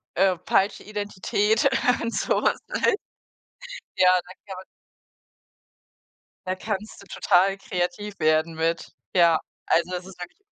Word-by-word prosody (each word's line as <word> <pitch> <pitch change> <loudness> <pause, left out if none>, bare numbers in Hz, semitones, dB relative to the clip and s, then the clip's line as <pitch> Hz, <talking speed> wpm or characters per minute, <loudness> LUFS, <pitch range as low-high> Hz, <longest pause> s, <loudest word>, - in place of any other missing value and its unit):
äh, 190 -1 +3
falsche 200 +2 +1
Identität 210 +2 0 0.4
und 230 0 -3
so - - 0
was, - - +2
ne? - - +1 1.0
Ja, 185 0 +6
da 180 - -12
gibt 200 - -12
es - - -15 1.8
Da 185 - 0
kannst 210 +2 -5
du - - -15
total 195 +1 +2
kreativ 195 +2 -4
werden 155 +1 +2
mit, 165 +1 -2 0.2
ja. 170 -3 +5 0.3
Also, 170 +2 +2
das 180 0 -4
ist 190 -1 -13
wirklich 175 - -9
185 Hz, 130 wpm, -24 LUFS, 175-205 Hz, 1.8 s, Ja